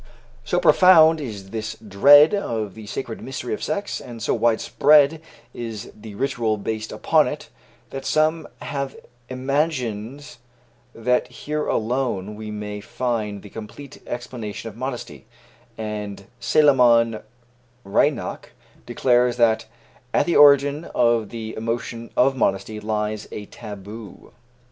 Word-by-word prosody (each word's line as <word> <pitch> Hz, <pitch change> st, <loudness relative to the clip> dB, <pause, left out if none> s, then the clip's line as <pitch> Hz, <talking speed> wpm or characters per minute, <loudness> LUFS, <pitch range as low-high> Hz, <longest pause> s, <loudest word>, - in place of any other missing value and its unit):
So -, -, 0 dB
profound 165 Hz, -4 st, +6 dB
is 100 Hz, -7 st, -7 dB
this 110 Hz, 0 st, -4 dB
dread 140 Hz, -, +6 dB
of 110 Hz, -, -2 dB
the 110 Hz, -1 st, -11 dB
sacred 115 Hz, +1 st, -5 dB
mystery 130 Hz, -3 st, -5 dB
of -, -, -4 dB
sex, 180 Hz, +7 st, -3 dB
and 120 Hz, -2 st, -9 dB
so -, -, 0 dB
widespread 145 Hz, +6 st, +3 dB, 0.3 s
is 115 Hz, -2 st, -6 dB
the 105 Hz, -1 st, -11 dB
ritual 120 Hz, -4 st, -1 dB
based 110 Hz, +1 st, -4 dB
upon -, -, +2 dB
it, -, -, -6 dB, 0.4 s
that 135 Hz, -, -6 dB
some 155 Hz, +1 st, +1 dB, 0.2 s
have 140 Hz, -1 st, -4 dB, 0.3 s
imagined 130 Hz, -2 st, -2 dB, 0.6 s
that 125 Hz, +2 st, +1 dB
here 150 Hz, +5 st, -4 dB
alone 110 Hz, -4 st, -1 dB
we 110 Hz, 0 st, -7 dB
may 105 Hz, -1 st, -6 dB
find 110 Hz, -3 st, -3 dB
the 105 Hz, -, -12 dB
complete 115 Hz, +6 st, -10 dB
explanation 120 Hz, -3 st, -6 dB
of 105 Hz, -, -14 dB
modesty, 125 Hz, +1 st, -6 dB, 0.5 s
and 105 Hz, -2 st, -5 dB
Salomon 120 Hz, -4 st, +4 dB, 0.6 s
Reinach 100 Hz, -, 0 dB, 0.4 s
declares 125 Hz, -1 st, +2 dB
that 115 Hz, -2 st, +2 dB, 0.5 s
"at -, -, +3 dB
the 175 Hz, -, 0 dB
origin 145 Hz, +1 st, +5 dB
of 115 Hz, -3 st, +2 dB
the 110 Hz, -2 st, -6 dB
emotion 115 Hz, +1 st, -4 dB
of 135 Hz, +2 st, +4 dB
modesty 105 Hz, -2 st, -1 dB
lies 105 Hz, 0 st, -3 dB
a 105 Hz, -, -6 dB
taboo." 105 Hz, 0 st, -10 dB
115 Hz, 125 wpm, -22 LUFS, 110-135 Hz, 0.6 s, profound